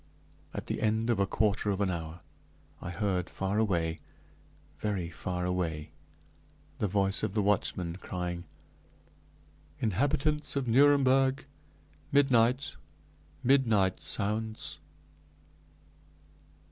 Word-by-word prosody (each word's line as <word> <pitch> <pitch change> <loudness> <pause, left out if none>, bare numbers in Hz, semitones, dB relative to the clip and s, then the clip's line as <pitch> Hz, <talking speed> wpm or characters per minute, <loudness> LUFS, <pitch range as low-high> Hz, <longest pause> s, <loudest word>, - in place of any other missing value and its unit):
At - - -5
the - - -3
end 110 +2 +1
of 115 - 0
a 100 - +2
quarter 105 +1 +1
of 100 -1 0
an 100 -2 +1
hour 80 -1 -5 0.6
I - - -5
heard, 90 -1 -1
far 95 +2 -1
away, 85 -7 0 0.8
very 95 -5 -2
far 90 +2 -3
away, 80 -4 -2 0.9
the 105 - +1
voice 95 0 +2
of 110 -3 -2
the 105 - +3
watchman, 90 -3 0
crying, 90 -2 -4 1.3
"Inhabitants 145 +8 0
of 135 -3 -1
Nuremberg, 135 +1 +4 0.7
midnight, 130 -1 +3 0.7
midnight 115 -8 +3
sounds!" 110 +2 -2
105 Hz, 100 wpm, -30 LUFS, 90-120 Hz, 1.3 s, Nuremberg